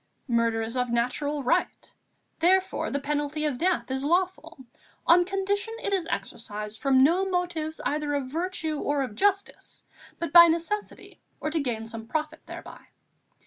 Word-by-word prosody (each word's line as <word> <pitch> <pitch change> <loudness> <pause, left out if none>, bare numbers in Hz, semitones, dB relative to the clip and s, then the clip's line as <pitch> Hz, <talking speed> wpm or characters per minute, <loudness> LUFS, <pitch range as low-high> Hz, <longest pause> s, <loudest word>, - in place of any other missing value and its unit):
Murder 230 -2 +1
is 225 +2 -4
of 250 -1 0
natural 260 +5 -1
right; 250 - -1 0.5
therefore, 370 +3 +2
the 280 - -1
penalty 295 +1 -2
of 275 -5 -1
death 335 -9 0
is 265 +1 -2
lawful, 350 +1 0 0.5
on 350 +1 +6
condition 400 +3 -2
it 400 - 0
is 365 -4 0
exercised 210 -6 -5
from 265 -2 +4
no 345 +7 +4
motives 350 -4 -2
either 295 0 -1
of 280 -2 -1
virtue 320 +1 -2
or 285 -1 0
of 250 -5 -5
justice, 400 - -1 0.3
but 335 -3 -4
by 340 0 +11
necessity 340 +6 -3 0.2
or 305 - -3
to 320 - 0
gain 235 -6 -2
some 225 0 -8
profit 305 +3 -3
thereby. - - -10
305 Hz, 155 wpm, -27 LUFS, 255-355 Hz, 0.5 s, by